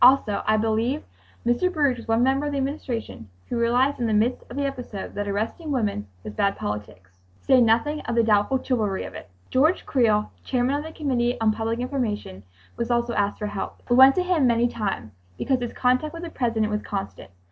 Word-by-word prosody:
Also 245 -5 +5
I 215 - +4
believe 225 +6 0 0.4
Mr. 240 +10 +2
Baruch 285 -7 +1
was 230 - -10
one 225 +1 +3
member 270 +3 +2
of - - -2
the - - -1
Administration 260 - -4 0.2
who 240 - -2
realized 250 +4 +2
in 235 - 0
the 220 - 0
midst 225 +4 +1
of 245 - -8
the 285 - 0
episode 250 -7 -5
that 205 0 -3
arresting 220 +11 -3
women 210 - -1 0.2
was 105 - -7
bad 200 - +1
politics, 105 -3 -6 0.3
to - - -30
say 260 -2 +6
nothing 240 +7 +2
of 235 - -3
the 230 - +4
doubtful 220 +4 +3
chivalry 215 -7 0
of - - -8
it. - - -10 0.2
George 310 +7 +3
Creel, 215 -5 +2
chairman 250 +1 0
of 290 +1 -1
the 320 - -7
Committee 250 -5 0
on 220 -1 +3
Public 225 +1 -2
Information, 235 - -3 0.4
was 235 - -2
also 235 0 +1
asked 205 -1 0
for 210 - -4
help. 205 -1 -5
We - - +6
went 265 +1 +8
to 365 - +2
him 350 -7 +2
many 235 0 +3
times, 200 - -3 0.3
because 265 -2 +1
his 240 -1 -3
contact 255 +6 +1
with 335 - -7
the 335 - -6
President 225 -5 0
was 210 0 -1
constant. 195 - -5
240 Hz, 210 wpm, -24 LUFS, 215-270 Hz, 0.4 s, went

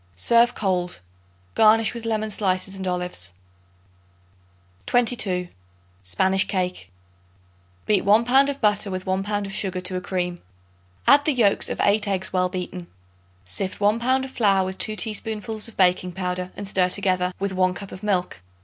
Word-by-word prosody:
Serve 235 - +3
cold. 180 - -2 0.5
Garnish 220 0 +4
with 235 -1 -7
lemon 220 -1 -1
slices 195 -1 -1
and 190 -1 -5
olives. 180 - -2 1.5
22. 200 -7 +1 0.5
Spanish 190 - +1
Cake. 180 - -3 1.0
Beat 205 -3 +2
1 215 +4 +4
pound 270 +3 +4
of 280 0 -4
butter 210 -1 +2
with 185 -1 -5
1 190 0 0
pound 205 0 -2
of 195 - -7
sugar 190 -2 -1
to 185 0 -3
a 180 - -2
cream. 180 -1 -3 0.6
Add 290 0 +6
the 305 - +2
yolks 220 -6 +2
of - - -4
8 210 +1 +2
eggs 190 -1 -2
well 180 -1 +1
beaten. 180 -1 -6 0.6
Sift 185 - -4
1 210 +2 +2
pound 260 +2 +1
of 265 - -10
flour 195 -6 +2
with 190 0 -6
2 215 - +1
teaspoonfuls 220 0 0
of 230 - -11
baking 180 -1 +2
powder 180 0 -4
and 200 - -4
stir 185 -2 +2
together 185 -1 0
with 195 0 -2
1 185 -1 +1
cup 200 +1 -9
of 185 - -9
milk. 180 - -1
195 Hz, 165 wpm, -23 LUFS, 180-215 Hz, 1.5 s, Add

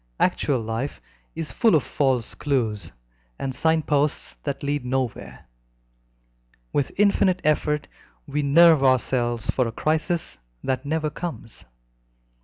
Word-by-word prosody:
Actual 135 -3 +1
life 115 +5 -4 0.4
is 165 -1 -4
full 225 -8 +3
of 150 - +3
false 130 -5 0
clues 110 - -1 0.5
and 135 -1 -3
sign 160 +4 +2
posts 145 - 0
that - - -4
lead 145 -1 -1
nowhere. 125 - -3 1.3
With 140 - 0
infinite 200 -2 +3
effort 150 0 +1 0.4
we 150 - -2
nerve 155 +1 +6
ourselves 120 -3 +1
for 125 -2 +1
a - - -3
crisis 155 - -1 0.2
that 130 +1 -2
never 155 0 -1
comes. 160 -11 -7
140 Hz, 120 wpm, -24 LUFS, 125-155 Hz, 1.3 s, nerve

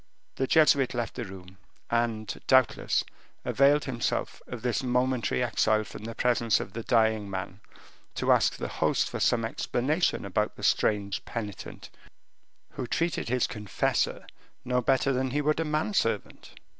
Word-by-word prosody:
The 135 - 0
Jesuit 140 -5 +4
left 120 -1 -2
the 120 - -5
room, 95 -1 -12 0.3
and, 115 -2 -1
doubtless, 130 -2 +3 0.4
availed 140 +2 +3
himself 120 -4 -2
of 120 -2 -7
this 125 -2 0
momentary 125 - 0
exile 110 0 +2
from 105 - -10
the 115 0 -6
presence 120 -2 +2
of - - -6
the 115 - -4
dying 110 -3 +2
man 95 0 -5 0.6
to - - +1
ask - - +3
the - - -4
host - - 0
for - - -5
some 115 -1 +2
explanation 145 - 0
about 105 +2 -1
this - - +2
strange 100 -2 0
penitent, 105 -4 -7 0.8
who 125 - -5
treated 165 -5 -1
his 125 0 +2
confessor 105 -2 -1 0.4
no 125 0 +1
better 135 +2 +2
than 130 +1 0
he 145 +4 -1
would 155 +2 +1
a 165 - 0
man 155 +7 -1
servant. 115 - -2
120 Hz, 155 wpm, -28 LUFS, 110-130 Hz, 0.8 s, Jesuit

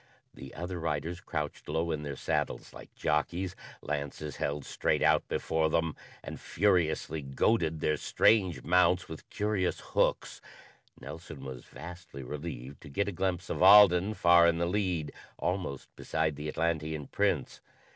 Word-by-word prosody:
The 65 +2 -11
other 90 0 -5
riders 80 +2 -3
crouched 75 -4 -5
low 80 +2 0
in 75 -2 -2
their 70 -2 -5
saddles - - -2
like - - -12
jockeys, 85 +5 -1 0.3
lances 75 0 -4
held 70 -1 -2
straight - - 0
out - - +3
before 80 -1 0
them, 80 0 0 0.3
and - - -7
furiously 85 -5 +1
goaded 80 +4 +1
their 75 - +1
strange 95 -1 +2
mounts 90 +1 +3
with 80 - -10
curious 105 -3 -1
hooks. - - +1 0.6
Nelson 75 -1 -9
was 65 -2 -8
vastly 85 -3 -10
relieved 70 -1 -7
to - - -11
get 100 +8 -1
a - - -3
glimpse 90 -1 -2
of - - -3
Alden 100 0 +7
far 85 -2 +6
in 85 -1 +2
the 85 - +1
lead, 90 -5 -1 0.2
almost 90 -7 -3
beside 80 -1 -1
the 75 +2 -5
Atlantean 80 -2 -1
Prince. - - -1
80 Hz, 145 wpm, -30 LUFS, 75-90 Hz, 0.6 s, Alden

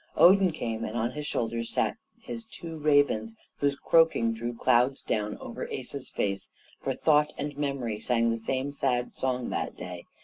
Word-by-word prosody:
Odin 190 0 +7
came, 115 -7 -3
and 110 +1 -3
on 120 +1 0
his 150 +2 -5
shoulders 115 -2 -2
sat - - 0 0.2
his 230 0 -6
two 165 -7 -8
ravens, 145 -7 +2 0.2
whose 140 -1 +1
croaking 160 -7 +3
drew 120 +1 -3
clouds 125 +3 +2
down 105 0 -1
over - - -6
the - - -4
Asa's - - -5
face, 100 -1 -2 0.3
for - - -1
Thought 150 -1 +3
and 145 0 -3
Memory 135 -7 -2
sang 115 0 +2
the 115 - 0
same 130 +5 -2
sad 125 -3 0
song 125 -2 -1
that - - -3
day. 90 -1 -7
125 Hz, 175 wpm, -28 LUFS, 115-145 Hz, 0.3 s, Odin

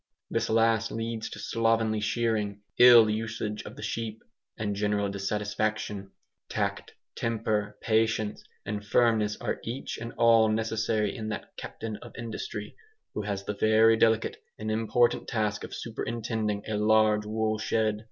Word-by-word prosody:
This - - 0
last 115 0 +3
leads 115 0 -3
to - - -8
slovenly 115 -1 +1
shearing, 105 -2 -1 0.2
ill 120 -2 +9
usage 110 -1 -3
of - - -9
the - - -9
sheep, 110 -1 -4 0.3
and 105 -2 -2
general 105 0 0
dissatisfaction. 105 0 -2 0.4
Tact, - - -2 0.2
temper, 105 -2 -1
patience, 110 -1 +1 0.2
and 105 0 -3
firmness 105 -1 +2
are - - -2
each 120 +4 -5
and 115 +1 -6
all 115 -1 +5
necessary 110 -1 0
in 110 -3 -4
that 110 - -6
Captain 110 -2 -6
of - - -12
Industry 110 -3 -6 0.4
who - - -2
has 100 -1 -3
the 105 - -3
very 110 +2 +5
delicate 110 0 +2 0.2
and 110 0 -3
important 115 +2 +2
task 105 -2 -1
of - - -7
superintending 110 -2 -3
a 110 -1 -1
large 105 0 +3
woolshed. 110 0 0
110 Hz, 140 wpm, -28 LUFS, 105-115 Hz, 0.4 s, ill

